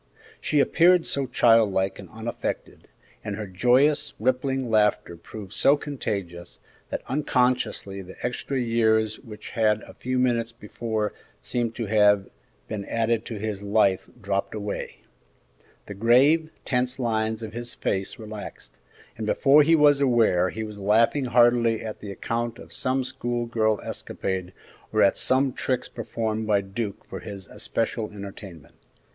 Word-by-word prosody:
She 150 - +1
appeared 175 +4 +4
so 140 -1 -1
childlike 105 -6 +3
and - - -10
unaffected, 110 +2 -5 0.4
and 105 -2 -4
her 105 0 -5
joyous, 130 +10 +2
rippling 130 +2 0
laughter 105 -5 +2
proved 95 +3 -10
so 140 +2 +4
contagious, 100 - -5 0.3
that - - -4
unconsciously 125 -8 0
the 95 0 -11
extra 130 +2 -2
years 110 -2 +2
which 105 -2 -10
a 110 -2 +1
few 130 +1 -3
moments 120 -2 +1
before 110 -1 -3 0.3
seemed 115 - -2
to 115 - -3
have 105 -2 +3 0.4
been 105 -2 -4
added 115 0 0
to 115 - -5
his 105 -1 -4
life 100 -2 +2
dropped 100 -1 -2
away; 105 -1 -5 0.8
the 100 - -7
grave, 130 +10 +4 0.2
tense 125 0 0
lines 110 -2 -1
of 110 -1 -7
his 120 0 -6
face 95 0 -2
relaxed, 110 -2 -9 0.4
and 110 - -3
before 140 +6 +5
he 165 +3 +5
was 145 -2 +5
aware 115 -9 +3
he 110 +3 -5
was 105 -1 -8
laughing 115 +7 +3
heartily 120 -2 +3
at 110 - -6
the 100 - -7
account 115 +4 -3
of - - -10
some 130 0 0
school 120 -1 -3
girl 110 -2 +1
escapade 95 -1 -4 0.4
or - - +3
at - - +4
some 130 0 +1
tricks 130 -2 -2
performed 110 -1 -3
by 105 -2 +3
Duke 100 +1 -5
for 95 - -7
his 100 +1 -8
especial 115 0 -3
entertainment. 100 -6 -10
110 Hz, 145 wpm, -25 LUFS, 105-125 Hz, 0.8 s, before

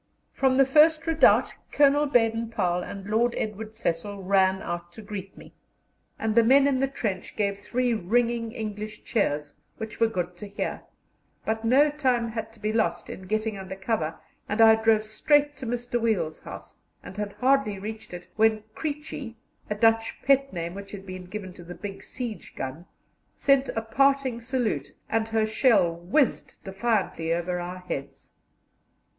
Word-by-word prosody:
From 265 -1 +2
the 270 - +6
first 310 +4 +5
redoubt 325 -1 +4 0.2
Colonel 290 +1 +4
Baden 225 -3 +2
Powell 180 -6 0
and 195 +2 -7
Lord 230 +3 +2
Edward 215 +1 -4
Cecil 200 0 -3
ran 190 0 +3
out 175 0 -5
to 220 - -10
greet 200 -2 -7
me, - - -14 0.6
and 220 -1 -1
the 235 - +6
men 270 +4 +5
in 275 -2 +2
the 270 - +2
trench 210 -8 -4
gave 200 -2 0
three 245 +3 0
ringing 230 +3 0
English 215 -2 -6
cheers, 150 -9 -1 0.2
which 220 -1 -7
were 230 - +5
good 180 -4 -3
to 205 - -7
hear; 200 - -4 0.6
but 220 +1 -1
no 275 +6 +5
time 255 -5 +1
had 225 0 -5
to 225 - -18
be 210 +1 -1
lost 175 -6 0
in 185 - -9
getting 215 -1 -1
under 190 0 -6
cover, 195 -5 -2 0.3
and 210 - -2
I 225 0 +9
drove 220 -1 +3
straight 290 +7 +2
to 255 - -6
Mr. 240 0 -2
Wiel's 210 -9 0
house, - - -11 0.2
and - - -10
had 205 -1 -3
hardly 260 -5 +2
reached 215 +3 -7
it 175 0 -8
when 220 -1 +3
"Creechy" 290 -5 -5 0.3
(a 210 - -1
Dutch 225 +1 +2
pet 275 0 +3
name 170 -1 -4
which 200 +1 -9
had 195 -1 -8
been 185 -1 -7
given 190 0 -7
to 175 - -12
the 175 +1 -9
big 195 -1 -7
siege 240 -4 -6
gun) 135 +7 -6 0.5
sent 275 -1 +3
a 225 - -1
parting 270 0 +2
salute, 230 - -2 0.2
and 225 0 0
her 225 -1 +1
shell 215 -6 +3
whizzed 195 - 0
defiantly 195 -4 -1
over 175 +1 -1
our 175 +1 -5
heads. 140 -6 -7
220 Hz, 170 wpm, -26 LUFS, 190-245 Hz, 0.6 s, I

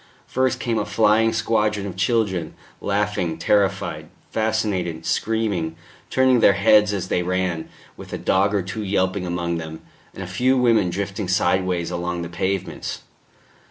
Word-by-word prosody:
First 130 0 0
came 115 -2 -1
a 105 - -1
flying 110 +1 +3
squadron 105 -3 0
of 95 - -6
children, 95 -4 0 0.3
laughing, 100 -4 -1
terrified, 100 -3 0 0.2
fascinated, 105 -7 -1
screaming, 100 -8 -1 0.3
turning 130 -1 +4
their 100 - +6
heads 105 +1 +4
as 95 -3 -3
they 90 - +1
ran, 90 -2 -2 0.3
with - - -11
a - - -3
dog 100 +2 +2
or 100 - +1
two 105 +4 -5
yelping 95 -1 0
among 85 -1 -2
them, 80 0 -7 0.3
and 95 - -6
a - - -7
few 125 +8 +2
women 115 -7 +3
drifting 100 +2 -3
sideways 90 -2 +1
along 90 0 -3
the 85 - -6
pavements. 95 -1 -3
95 Hz, 150 wpm, -22 LUFS, 90-110 Hz, 0.3 s, their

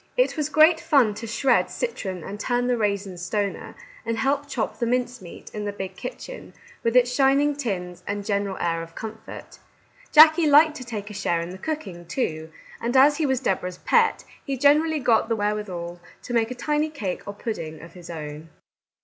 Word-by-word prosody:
It - - +2
was 300 -2 -1
great 315 +2 +5
fun 260 -11 +3
to 230 +3 -7
shred 240 +3 +2
citron 190 - -4
and 200 +4 -7
turn 245 +1 0
the 250 0 +2
raisin 200 -4 -2
stoner, 200 +2 -3 0.3
and 230 0 -2
help 275 +5 0
chop 275 - -3
the 235 - 0
mince 250 0 -1
meat, 175 - -11
in 210 -1 -4
the 205 - -2
big 190 -2 -6
kitchen, - - -8 0.3
with 230 +1 0
its 250 0 +4
shining 280 +2 +3
tins, 185 -10 -4
and 205 0 -3
general 200 -2 -1
air 165 -1 -1
of 165 0 -10
comfort. 220 0 -9 0.5
Jackie 315 +1 +8
liked 300 +2 +6
to 255 - -7
take 215 -4 -6
a - - -8
share 190 -4 0
in 170 +1 -5
the 190 - -9
cooking, 195 - -5
too, 160 -7 -3 0.3
and 240 +3 +1
as 290 +2 +6
he 315 -2 +1
was 265 -1 0
Deborah's 185 -5 -1
pet, 470 - +2 0.2
he 275 -2 -3
generally 300 +3 +4
got 230 -3 +2
the 230 - +2
wherewithal 200 -5 -3 0.2
to 245 - -6
make 230 -1 +2
a 250 - -5
tiny 300 +5 0
cake 210 - -4
or 200 - -4
pudding 165 -8 -5
of 165 +1 -12
his 175 -2 -12
own. 155 -1 -7
225 Hz, 195 wpm, -24 LUFS, 190-280 Hz, 0.5 s, Jackie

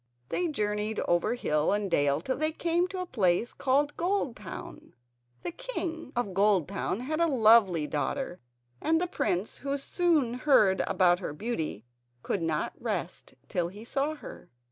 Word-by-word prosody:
They 355 - 0
journeyed 210 -6 -1
over 175 +7 +1
hill 150 -10 +1
and 205 -2 -1
dale 145 -1 +2
till 260 +9 -1
they 310 +1 +1
came 340 +2 0
to 370 0 -5
a - - -3
place 210 - +1
called 285 +2 +1
Goldtown. 280 - -3 0.5
The - - -3
King 335 - -5
of 240 -6 -1
Goldtown 195 +1 +1
had 310 +5 -2
a 335 - +4
lovely 220 - +5
daughter, 175 - -2 0.4
and 325 +1 +2
the 360 - +1
prince, 195 - -1
who 280 0 -2
soon 300 -4 +1
heard 215 -10 +4
about 175 -1 +3
her 175 - -4
beauty, 160 - -3 0.4
could 195 - -1
not 160 -1 -1
rest - - -4
till 175 -4 -1
he 205 +5 -10
saw 280 +5 -1
her. - - -11
230 Hz, 155 wpm, -29 LUFS, 185-310 Hz, 0.5 s, lovely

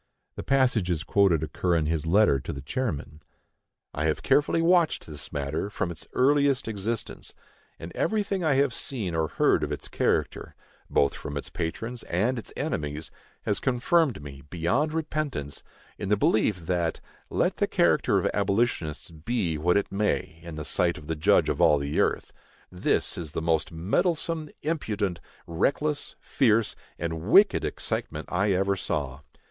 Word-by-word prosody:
The - - -6
passages 110 - +2
quoted 95 -6 +3
occur 85 +3 0
in 80 -2 +1
his 80 0 -1
letter 95 -5 +4
to - - -5
the 70 -1 -7
chairman: 75 - -3 0.7
I 75 - -2
have 80 -1 0
carefully 145 +4 +3
watched 170 -1 +3
this 75 -2 -8
matter 75 +7 -2
from 95 -3 -2
its 80 - -7
earliest 140 -1 +3
existence, 110 +1 -4 0.4
and 80 +1 -8
everything 200 -3 0
I 150 -4 +3
have 135 -2 +2
seen 110 -11 -3
or 80 -1 +1
heard - - +2
of - - -2
its - - -4
character, - - -1 0.3
both 70 - +3
from 70 - -6
its - - -5
patrons 115 +9 -4
and 115 +8 +1
its - - -8
enemies, 75 -1 -3 0.3
has 105 - 0
confirmed 130 - +1
me, 70 -2 -9
beyond 105 - 0
repentance, 155 - -3 0.4
in 100 - -3
the 105 - +3
belief, 100 -4 +2
that, 85 -2 0 0.3
let - - 0
the - - +1
character - - +3
of - - +1
abolitionists 100 -6 0
be 85 +1 -2
what 90 +5 +2
it 100 - -1
may 100 -5 -1
in 85 -2 -8
the 75 -1 -5
sight 85 -1 +1
of 75 - -11
the 80 +2 -2
Judge 75 - +3
of - - -1
all 75 - +6
the 70 +1 -2
earth, - - 0 0.4
this 90 0 0
is 80 -3 -5
the - - -1
most 80 0 0
meddlesome, 155 - -1
impudent, 105 - -1 0.3
reckless, 145 - -1
fierce, 115 -4 +2 0.2
and 80 -1 -3
wicked 195 - +5
excitement - - -3
I 100 +4 +1
ever 95 +1 +1
saw. 70 -7 -3
95 Hz, 160 wpm, -27 LUFS, 80-130 Hz, 0.7 s, all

